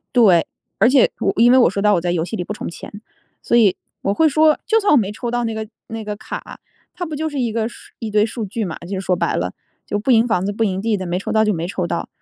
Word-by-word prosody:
对， 190 -9 +5 0.3
而 220 - +5
且 260 -1 +5
我 - - +1
因 240 +2 +6
为 255 - +6
我 245 - +6
说 200 +2 -3
白 210 - +3
了 205 - +5
我 170 - 0
在 175 0 -1
游 165 -2 0
戏 220 - -5
里 180 - -3
不 210 - -5
充 - - -6
钱， 170 - -10 0.5
所 - - 0
以 215 -6 +5 0.3
我 195 - 0
会 320 +9 +4
说 310 +1 +3
就 450 -1 +3
算 410 -1 +2
我 295 - +6
没 205 -3 0
抽 235 +2 -5
到 240 0 0
那 225 - -2
个 220 0 -5 0.2
那 225 0 -6
个 210 0 -4
卡， - - -8 0.3
它 355 - -4
不 310 -2 -5
就 315 +2 -2
是 290 -2 -4
一 240 -3 0
个 220 0 -1
数 - - -15
一 220 -2 -5
堆 210 0 +3
数 225 0 -5
据 215 +2 -3
嘛， 175 - -5
就 185 +2 -5
说 185 -1 +1
白 170 -1 -1
了。 90 0 -2 0.3
就 205 - -1
不 240 - -4
赢 230 -2 +5
房 210 -6 0
子 205 - -2
不 225 - 0
赢 190 -3 -1
地 220 0 +1
的， 190 -2 -4
没 175 +1 -2
抽 - - -4
到 220 0 +4
就 210 -1 +2
没 170 -1 -3
抽 185 -1 -2
到。 170 - -3
215 Hz, 325 characters per minute, -20 LUFS, 190-240 Hz, 0.5 s, 因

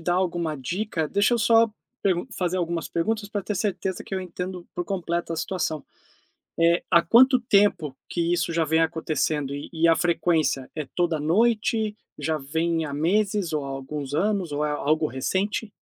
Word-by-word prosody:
dar 175 +2 0
alguma 175 -4 -1
dica, 170 - -2
deixa 205 +7 +2
eu - - +1
só 230 0 +5 0.3
pergun 185 +1 +1
fazer 180 0 -1
algumas 170 -2 -2
perguntas 210 +5 -1
pra 205 -1 -3
ter 210 +3 -3
certeza 190 -2 -2
que - - -6
eu 190 - -1
entendo 180 0 -6
por 175 - -2
completo 170 -3 -2
a - - -3
situação, 160 -3 -2 0.7
eh, 170 +1 +4
há 170 - +7
quanto 250 +8 +6
tempo 200 - +2
que 170 0 0
isso 175 -1 0
já 165 0 +2
vem 160 +1 +2
acontecendo, 155 -3 -1
e 145 - -6
e 165 0 +2
a 165 - +5
frequência 165 -6 +1
é 155 -2 -3
toda 170 -3 +1
noite, 215 - +1 0.2
já 160 -1 -1
vem 160 +3 -1
há 145 - -5
meses 195 +3 +1
ou 150 -2 -1
há - - -5
alguns 135 +1 -5
anos 190 -1 0
ou 150 +1 -1
é 150 - 0
algo 155 +2 +1
recente? 195 - -2
170 Hz, 180 wpm, -25 LUFS, 155-200 Hz, 0.7 s, há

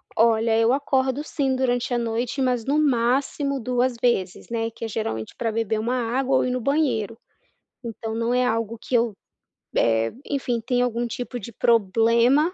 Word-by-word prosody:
Olha, 225 0 +3
eu 225 +2 +4
acordo 265 0 0
sim 275 -4 -1
durante 245 -1 0
a - - +2
noite, 235 +3 -2
mas 250 -3 0
no 285 +3 +2
máximo 275 +1 +1
2 250 +1 0
vezes, 195 -7 0
né, 225 -1 -1
que 230 - -7
é - - -3
geralmente 205 - -4
pra 230 - -2
beber 220 -1 -1
uma 235 +3 -1 0.2
água 265 0 +2
ou - - +2
ir 255 - -1
no 250 0 -2
banheiro. 235 -6 0 0.7
Então 225 -1 -5
não 230 +2 0
é 250 - +3
algo 230 -1 -1
que 255 - -6
eu, 230 -2 +2 0.6
eh, 115 0 +2
enfim 255 -4 -2
tem 245 +2 0
algum 240 -1 0
tipo 245 +1 -5
de 235 - -8
problema. 235 - +3
240 Hz, 175 wpm, -24 LUFS, 225-260 Hz, 0.7 s, eu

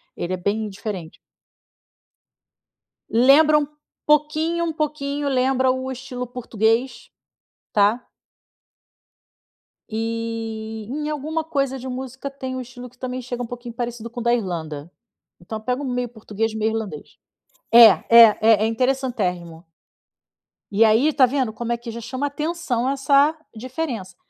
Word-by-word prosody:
Ele 175 +2 -3
é 185 - -1
bem 210 +4 -1
diferente. 195 -4 -7 1.9
Lembra 285 +6 +6
um 295 -1 0 0.4
pouquinho 310 +3 +2
um 325 - -2
pouquinho 290 -2 -2
lembra 260 0 +2
o 260 0 -3
estilo 255 -1 -6
português, 235 0 -1 0.6
tá. 210 +4 +2 1.8
E, 225 -1 -4
em 300 +3 -3
alguma 310 +2 -2
coisa 275 -4 -1
de 260 +1 -8
música, 260 +1 -6
tem 260 -1 -6
um 255 - -3
estilo 250 0 -10
que 245 - -27
também 255 0 -4
chega 245 0 -5
um - - -3
pouquinho 240 0 -8
parecido 235 -1 -5
com 240 - -7
o - - -4
da 235 0 +3
Irlanda. 165 -8 -4 0.5
Então 215 +5 -7
pega 250 +4 -2
um - - -4
meio 245 -1 -2
português 220 -1 -3
meio 220 0 0
irlandês. 210 -9 -6 0.6
É, 235 0 +11 0.2
é, 230 -2 +8 0.3
é - - +3
interessantérrimo. 225 -9 -1 1.1
E 205 +3 +4
aí, 225 +8 +4
tá 265 - +6
vendo, 255 -3 -1
como 235 +1 -4
é 235 - 0
que 235 0 -8
já 235 +1 -7
chama 260 +5 -3
atenção 285 -5 -2
essa 280 +2 +3 0.2
diferença. 240 - -5
245 Hz, 140 wpm, -22 LUFS, 220-270 Hz, 1.9 s, É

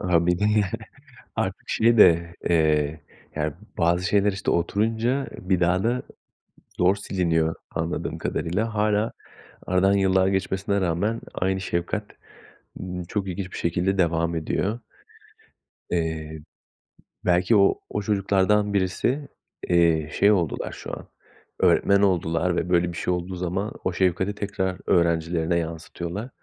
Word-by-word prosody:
A, 85 -1 +2
bir 90 0 +2
de 105 - 0
ya, 105 -2 +2 0.7
artık - - -3
şey 115 +1 +3
de, 85 -3 +5
eee, 80 -2 +2 0.4
yani 75 -1 -1 0.2
bazı 85 +2 +2
şeyler, 100 +2 +3
işte, 95 - -2
oturunca 115 +9 0
bir 90 -1 0
daha 90 +2 +2
da 120 +2 +1 0.8
zor 90 +2 +4
siliniyor 85 -5 0 0.2
anladığım 80 +1 -3
kadarıyla. 105 +7 -2
Hâlâ, 105 +1 +1 0.6
aradan 95 +2 +3
yıllar 95 -1 +3
geçmesine 95 +1 0
rağmen, 95 +6 0
aynı 95 +1 -1
şefkat, 90 +4 -2 0.8
ımm, 90 -1 -5
çok 95 +2 -3
ilginç 95 0 -5
bir - - -6
şekilde 90 +3 0
devam 85 -1 +1
ediyor. 100 +8 -1 1.1
Eee, 80 -2 -2 0.9
belki 90 +5 +3
o, 100 -1 +4
o 105 - -2
çocuklardan 100 0 +2
birisi, 110 +9 0 0.4
eee, 85 -3 +3
şey 100 +1 +4
oldular 85 -7 0
şu - - -8
an, - - -12 0.5
öğretmen 100 0 +4
oldular 85 -2 +1
ve 85 - -1
böyle 90 -1 +2
bir 85 - -8
şey 90 - 0
olduğu 90 +1 -4
zaman, 90 +4 -3
o 90 - -1
şefkati 95 +2 +1
tekrar 95 -2 -2
öğrencilerine 85 0 +2
yansıtıyorlar, 85 +6 -5
90 Hz, 130 wpm, -24 LUFS, 85-100 Hz, 1.1 s, de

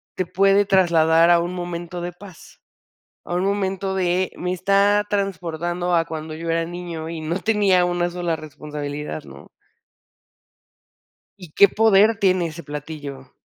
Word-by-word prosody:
te 185 - -1
puede 195 +3 +3
trasladar 170 -3 +4
a 170 - +5
un 175 +1 -3
momento 175 -1 -5
de 175 +1 -4
paz, 185 -1 -15 0.6
a - - -6
un 180 - 0
momento 195 -1 -1
de 185 0 0
me 180 - -3
está 200 +3 +2
transportando 175 -3 -2
a 165 -1 +2
cuando 155 -1 -6
yo 165 +1 -6
era 165 0 +1
niño 170 -2 -6
y 165 -1 -6
no 165 +4 -2
tenía 200 -4 +3
una 175 0 0
sola 175 -1 -2
responsabilidad, 150 -1 -6
¿no? - - -13 1.9
Y 175 -4 -12
qué 200 - +6
poder 220 0 +4
tiene 185 -4 +2
ese 165 +2 -9
platillo. 145 -2 -8
175 Hz, 145 wpm, -22 LUFS, 165-190 Hz, 1.9 s, qué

